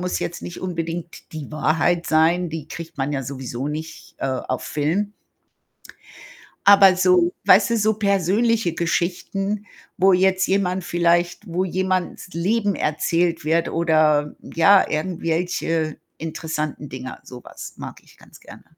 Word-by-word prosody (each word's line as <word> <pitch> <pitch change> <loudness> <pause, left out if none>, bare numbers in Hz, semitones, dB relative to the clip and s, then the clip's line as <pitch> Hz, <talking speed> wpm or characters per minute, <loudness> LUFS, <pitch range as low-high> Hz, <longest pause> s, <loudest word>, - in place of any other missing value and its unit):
muss 180 0 -2
jetzt 170 - -4
nicht 175 - -7
unbedingt 170 -1 -5
die 155 -3 -7
Wahrheit 165 +3 +1
sein, 165 +3 +3
die 155 -2 -6
kriegt 165 +1 -9
man 135 +2 -1
ja 135 - -2
sowieso 130 0 -5
nicht, 160 +2 -7
äh, - - -2
auf 130 -1 -3
Film. 175 +8 -1 1.5
Aber 195 -2 +8
so 180 -1 +3
weißt 200 +4 +6
du, 230 - +2
so 215 0 +2
persönliche 200 0 +1
Geschichten, 195 +4 -2 0.3
wo 190 +1 +5
jetzt 190 +1 +3
jemand 190 -1 0
vielleicht 175 +3 +1
wo 180 +1 -1
jemandes 185 0 -2
Leben 200 +4 0
erzählt 165 +2 0
wird 165 +2 +1
oder, 155 -3 +2
ja, 190 +4 +4
irgendwelche 165 -1 -1 0.2
interessanten 155 -2 -4
Dinger. 130 0 -8
So 125 -1 -11
was - - -10
mag - - -8
ich - - -22
ganz - - -17
gerne. - - -14
170 Hz, 135 wpm, -22 LUFS, 155-185 Hz, 1.5 s, Aber